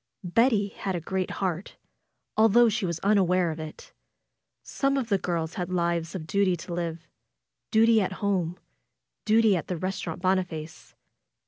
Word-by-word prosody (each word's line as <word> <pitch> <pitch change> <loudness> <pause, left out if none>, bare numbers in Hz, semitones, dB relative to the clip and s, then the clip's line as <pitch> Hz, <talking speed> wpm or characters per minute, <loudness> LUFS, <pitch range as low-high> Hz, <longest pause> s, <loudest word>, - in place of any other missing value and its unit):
Betty 205 +2 +2
had 195 -1 -4
a - - -1
great 185 +3 -2
heart, 185 -1 -3 0.6
although 225 +2 +5
she 215 -3 -1
was 170 -2 -2
unaware 185 -4 +3
of 155 - -7
it. 155 -1 -9 0.7
Some 275 0 0
of 250 -4 -2
the 200 -2 +2
girls 170 -2 -2
had 180 -1 -4
lives 170 -1 -1
of 165 -4 -5
duty 195 +2 +2
to 170 +2 -7
live 170 -1 -4 0.3
— - - -58
duty 225 -1 +5
at 190 -1 -1
home; 185 -4 -1 0.7
duty 220 -1 +4
at 170 - -3
the 180 - -2
Eestaurant 180 -2 -4
Boniface. 180 -4 -2
185 Hz, 155 wpm, -27 LUFS, 170-205 Hz, 0.7 s, although